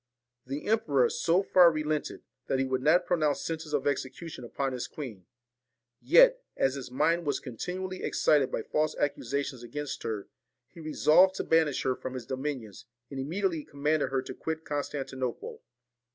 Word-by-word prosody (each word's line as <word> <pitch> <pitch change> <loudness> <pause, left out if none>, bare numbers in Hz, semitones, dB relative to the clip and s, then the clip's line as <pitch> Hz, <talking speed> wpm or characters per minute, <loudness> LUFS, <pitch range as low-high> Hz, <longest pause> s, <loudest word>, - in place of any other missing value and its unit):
The 140 +3 -5
emperor 150 - +2
so 175 +4 +2
far 180 -3 +6
relented, 155 -1 -2 0.2
that 135 - +1
he 135 - +1
would 130 -1 -1
not 175 +6 +4
pronounce 155 -5 +1
sentence 160 -1 -4
of 145 -2 0
execution 145 +1 -3
upon 135 +3 -3
his 125 - -4
queen; 115 - -8 0.7
yet, - - +6 0.2
as 135 - +2
his 135 -3 -6
mind 165 +7 +1
was 145 - +1
continually 185 +9 -5
excited 145 -4 +2
by 110 - -2
false 155 0 0
accusations 140 -2 -2
against 145 +4 -5
her, 105 -3 -4 0.4
he 170 - -15
resolved 165 +4 +4
to - - -2
banish 160 -4 +2
her 130 -1 +1
from 130 +1 -6
his 125 -3 -6
dominions, 130 -5 -5 0.3
and 135 - -5
immediately 165 +3 -1
commanded 150 +2 0
her 135 -1 -1
to - - -7
quit 160 0 -5
Constantinople. 135 -4 -4
145 Hz, 160 wpm, -29 LUFS, 130-165 Hz, 0.7 s, far